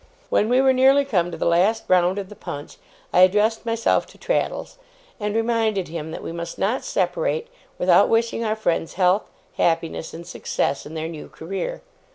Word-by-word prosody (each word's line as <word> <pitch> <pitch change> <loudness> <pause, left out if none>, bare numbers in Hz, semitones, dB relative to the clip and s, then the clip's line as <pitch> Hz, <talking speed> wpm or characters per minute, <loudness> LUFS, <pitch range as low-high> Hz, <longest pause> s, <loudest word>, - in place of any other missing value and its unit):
When 215 - +2
we 250 +2 +4
were 265 -1 +4
nearly 270 +2 +5
come 180 -10 +1
to 170 - -7
the - - -2
last 185 +7 +3
round 180 +1 +3
of 195 -2 -4
the 210 - -11
punch, 145 -5 -8 0.4
I - - +4
addressed 210 +5 +4
myself 230 0 +1
to - - -17
Traddles, - - -2 0.4
and 210 0 -2
reminded 225 -5 0
him 160 -1 -5
that 160 - -7
we - - -5
must 170 0 -6
not 220 +7 0
separate, 485 -1 -1 0.3
without - - +4
wishing 230 0 +1
our 215 -1 0
friends 170 -6 -1
health, 185 +2 +2 0.3
happiness, 165 -1 0
and 170 +1 -9
success 140 -3 -2
in 155 - -9
their 160 0 -3
new 160 -2 -8
career. 195 - -5
200 Hz, 185 wpm, -23 LUFS, 170-230 Hz, 0.4 s, nearly